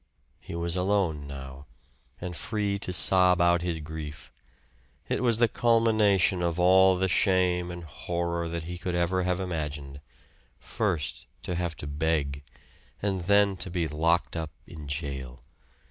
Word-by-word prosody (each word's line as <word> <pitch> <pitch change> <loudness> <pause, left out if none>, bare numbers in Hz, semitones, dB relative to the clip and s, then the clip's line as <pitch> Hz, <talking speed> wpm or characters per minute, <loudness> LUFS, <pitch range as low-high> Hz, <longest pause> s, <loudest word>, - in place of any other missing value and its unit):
He - - -8
was 85 0 -2
alone 90 -6 0
now, 70 0 -9 0.5
and 90 -1 -5
free 105 0 -2
to 90 - -1
sob 90 0 +5
out 85 0 +4
his 85 -2 -2
grief. 75 -1 -8 0.8
It - - -1
was 120 -3 +2
the 120 0 +5
culmination 110 -5 +3
of 85 0 -1
all 95 +1 +6
the 95 +1 +1
shame 90 -2 +2
and 85 0 -7
horror 85 +2 -3
that 85 -1 -4
he 90 +1 -6
could 90 0 -3
ever 85 +2 +1
have 90 0 0
imagined; 75 -6 -4 0.6
first, 85 - -3 0.2
to 90 - -3
have 85 -2 -2
to - - -8
beg, 70 -1 -1 0.6
and 95 -2 -1
then 100 0 +4
to 90 - -4
be 85 -2 -1
locked 80 +4 +1
up 80 -2 -3 0.2
in 75 -2 -10
jail. 70 -4 -5
85 Hz, 150 wpm, -27 LUFS, 80-95 Hz, 0.8 s, all